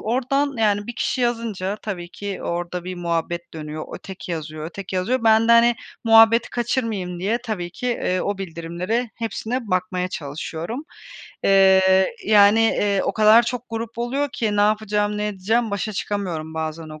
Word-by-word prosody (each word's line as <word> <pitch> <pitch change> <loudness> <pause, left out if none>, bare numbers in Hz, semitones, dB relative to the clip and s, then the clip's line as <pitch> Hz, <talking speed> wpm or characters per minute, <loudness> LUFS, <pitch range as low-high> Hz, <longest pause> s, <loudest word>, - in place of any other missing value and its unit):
oradan, 270 +5 0
yani, 205 -2 +1
bir 240 - -6
kişi 255 - -1
yazınca 225 -5 -1
tabii 180 -5 -5
ki 200 +1 -6
orada 175 +1 -3
bir 185 - -5
muhabbet 170 0 -3
dönüyor, 155 0 -6
öteki 190 -2 -8
yazıyor, 155 -1 -5
öteki 185 +2 -6
yazıyor. 240 +8 0
Ben 225 0 +5
de, - - +7
hani, 235 +1 +6 0.3
muhabbeti 225 +1 +6
kaçırmayayım 225 -7 -2
diye 210 +6 0
tabii 190 -7 -4
ki, 215 +8 -6
eee, 185 -6 0
o 200 -1 -2
bildirimlere 180 +6 -3
hepsine 230 +2 -3
bakmaya 185 0 -1
çalışıyorum, 165 - -5 0.6
eee, 190 -1 +5 0.2
yani, 205 +1 +6
eee, 205 -3 +2
o - - 0
kadar 220 +2 +6
çok 240 0 -3
grup 230 0 -5
oluyor 265 +5 -1
ki 210 -3 -1
ne - - +3
yapacağım, 210 0 +1
ne 210 - -1
edeceğim? 210 +3 0
Başa 200 +2 -2
çıkamıyorum 180 -6 -3
bazen 160 0 -4
o 155 0 -10
205 Hz, 160 wpm, -22 LUFS, 180-225 Hz, 0.6 s, de